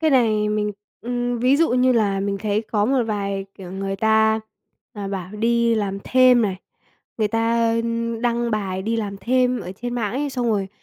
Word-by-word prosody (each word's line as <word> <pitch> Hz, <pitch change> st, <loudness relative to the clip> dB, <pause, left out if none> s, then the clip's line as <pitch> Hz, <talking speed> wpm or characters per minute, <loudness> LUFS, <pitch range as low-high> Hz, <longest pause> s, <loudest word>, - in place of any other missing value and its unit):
Cái 315 Hz, -1 st, +2 dB
này 220 Hz, -5 st, +3 dB
mình 210 Hz, 0 st, 0 dB, 0.3 s
ừm, 245 Hz, 0 st, -2 dB
ví 255 Hz, +4 st, +3 dB
dụ 330 Hz, +2 st, +2 dB
như 255 Hz, +1 st, +3 dB
là 205 Hz, -4 st, +1 dB
mình 200 Hz, 0 st, -2 dB
thấy 210 Hz, +1 st, -1 dB
có 205 Hz, -2 st, +2 dB
một 260 Hz, +2 st, +2 dB
vài, 200 Hz, -2 st, -2 dB
kiểu, 185 Hz, -2 st, -10 dB
người 195 Hz, 0 st, -3 dB
ta, 220 Hz, +1 st, +3 dB, 0.5 s
à, 205 Hz, -2 st, -6 dB
bảo 190 Hz, -2 st, -5 dB
đi 230 Hz, +2 st, +2 dB
làm 200 Hz, -3 st, -2 dB
thêm 255 Hz, -2 st, +5 dB
này, 195 Hz, -4 st, -1 dB, 0.6 s
người 215 Hz, -1 st, +2 dB
ta, 230 Hz, +1 st, +1 dB
ưm, 230 Hz, 0 st, -2 dB
đăng 235 Hz, 0 st, 0 dB
bài 195 Hz, -3 st, -2 dB
đi 225 Hz, +3 st, -1 dB
làm 205 Hz, -3 st, -3 dB
thêm 250 Hz, +1 st, +1 dB
ở 180 Hz, -, -7 dB
trên 240 Hz, +5 st, -5 dB
mạng 220 Hz, -3 st, -2 dB
ấy, 285 Hz, +2 st, -2 dB
xong 250 Hz, -2 st, -2 dB
rồi 200 Hz, -3 st, 0 dB
225 Hz, 200 wpm, -22 LUFS, 205-240 Hz, 0.6 s, thêm